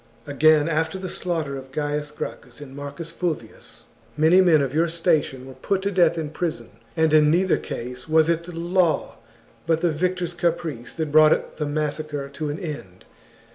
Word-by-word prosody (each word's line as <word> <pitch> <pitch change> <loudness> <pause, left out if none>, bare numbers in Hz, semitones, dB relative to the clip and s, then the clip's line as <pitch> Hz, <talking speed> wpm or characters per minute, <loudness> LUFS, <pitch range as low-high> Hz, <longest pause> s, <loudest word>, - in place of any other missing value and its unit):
Again, 150 +1 +4
after 160 +2 0
the 185 -1 -5
slaughter 165 -7 -3
of 135 0 -10
Gaius 150 +1 -2
Gracchus 130 -4 -8
and 135 -2 -10
Marcus 145 +4 -7
Fulvius, 160 -10 -5 0.3
many 160 +5 +6
men 170 -4 +5
of 135 -1 -3
your 165 +2 +2
station 160 -6 0
were 135 - -10
put 190 +9 -2
to 200 - 0
death 175 -3 +3
in 155 -2 -3
prison, 165 0 -4 0.3
and 160 -1 +3
in 150 -1 +6
neither 180 +3 +3
case 125 +4 -7
was 160 0 +4
it 170 0 0
the 180 - -8
law 175 -1 +1 0.5
but 165 -1 +2
the 175 - +2
victors' 180 +2 -1
caprice 165 -7 -2
that 160 -3 -3
brought 155 0 +4
the 150 - -2
massacre 150 -1 -3
to 150 +2 -4
an 145 - -3
end. 145 - -8
155 Hz, 175 wpm, -23 LUFS, 145-170 Hz, 0.5 s, many